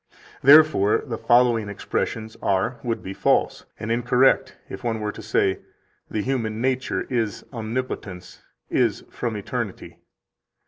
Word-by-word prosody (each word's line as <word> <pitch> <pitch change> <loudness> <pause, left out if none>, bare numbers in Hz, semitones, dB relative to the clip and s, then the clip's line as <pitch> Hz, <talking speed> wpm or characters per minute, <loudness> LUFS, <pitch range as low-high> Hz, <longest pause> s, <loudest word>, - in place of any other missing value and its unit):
Therefore 140 -8 +6
the 115 -5 -5
following 120 -3 +3
expressions 110 +2 -3
are 100 +6 0
[would 115 -2 -2
be] 95 - -6
false - - +1
and 110 - -4
incorrect 125 +3 +2
if 95 - -8
one 115 -2 -1
were 105 -1 -2
to 110 - -10
say: 100 -2 +1 0.5
"The 105 - -2
human 115 -5 -2
nature 130 +1 -1
is 115 -5 -2
Omnipotence, 110 -5 -5 0.3
is - - +1
from 115 -3 -3
eternity." 100 - -5
115 Hz, 130 wpm, -23 LUFS, 105-125 Hz, 0.5 s, Therefore